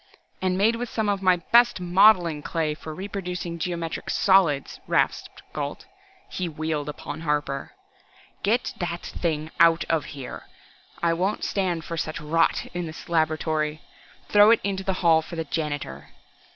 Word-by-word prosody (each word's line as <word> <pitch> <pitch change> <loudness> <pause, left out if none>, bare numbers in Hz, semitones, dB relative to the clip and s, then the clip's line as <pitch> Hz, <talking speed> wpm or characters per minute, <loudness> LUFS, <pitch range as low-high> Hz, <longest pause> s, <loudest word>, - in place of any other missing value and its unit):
"And 185 -1 +1
made 220 +4 +3
with 245 0 -4
some 220 -2 -1
of 200 -1 0
my 185 -1 +5
best 235 +6 +4
modeling 180 -3 +4
clay 155 -1 -1
for 155 +1 -8
reproducing 180 -1 -5
geometric 170 -2 -3
solids!" 175 -8 +3
rasped - - 0
Gault. 145 -1 -4 0.4
He 180 -2 -3
wheeled 155 -2 -3
upon 150 +1 -7
Harper. 150 -3 -2 0.7
"Get 230 +4 +1
that 175 -1 -3
thing 155 -2 -3
out 165 0 +5
of 160 -2 +1
here! 130 -2 -8 0.6
I 170 -1 +3
won't 185 +5 -1
stand 175 -5 -1
for 165 - -5
such 155 0 -3
rot 165 +2 +1
in 175 -1 -3
this 160 +2 -10
laboratory. 155 -1 0 0.4
Throw 205 +1 +6
it 230 - +6
into 195 -1 -2
the 190 - 0
hall 160 -1 +6
for 170 - -9
the 165 -1 -3
janitor!" 145 - -4
170 Hz, 150 wpm, -25 LUFS, 155-190 Hz, 0.7 s, Throw